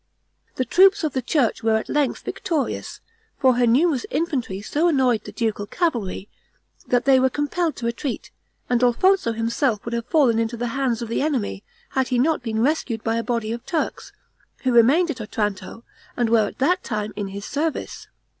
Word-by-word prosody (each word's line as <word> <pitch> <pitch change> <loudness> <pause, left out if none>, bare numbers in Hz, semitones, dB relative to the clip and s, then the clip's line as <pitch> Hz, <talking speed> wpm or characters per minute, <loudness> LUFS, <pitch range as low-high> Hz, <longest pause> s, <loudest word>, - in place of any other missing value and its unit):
The 255 - -1
troops 380 - +5
of 305 -4 -1
the 260 - -1
church 250 -2 0
were 225 -1 +2
at 220 - -4
length 295 -2 0
victorious, 315 -6 -3 0.4
for 260 -2 +4
her 245 -1 +3
numerous 270 +2 +3
infantry 260 - -2
so 295 +11 0
annoyed 255 - +2
the - - -7
ducal 215 -3 -2
cavalry, 225 - -2 0.6
that 245 -1 +1
they 270 -1 +6
were 260 0 +3
compelled 295 +4 -1
to 235 - -6
retreat, 235 +3 -3 0.4
and 245 -1 +1
Alfonso 250 +4 +3
himself 230 0 -1
would 235 - -4
have 235 0 -3
fallen 255 -8 +3
into 230 +1 -1
the 240 +1 -2
hands 245 -3 -1
of - - -5
the 230 - -1
enemy, 260 -9 -1 0.3
had 265 -1 0
he 250 - 0
not 305 +5 +2
been 225 -2 -1
rescued 260 -6 -1
by 225 0 0
a 230 - -1
body 230 -1 -2
of 235 0 -5
Turks, 330 -3 -3 0.5
who 260 - +2
remained 285 +9 +5
at 255 -5 -7
Otranto, 210 0 -4 0.3
and 235 -2 +1
were 220 -3 +4
at - - -9
that 355 +8 +1
time 215 -2 -3
in 205 -1 -3
his 200 +1 -7
service. 305 +2 -3
245 Hz, 190 wpm, -23 LUFS, 225-290 Hz, 0.6 s, they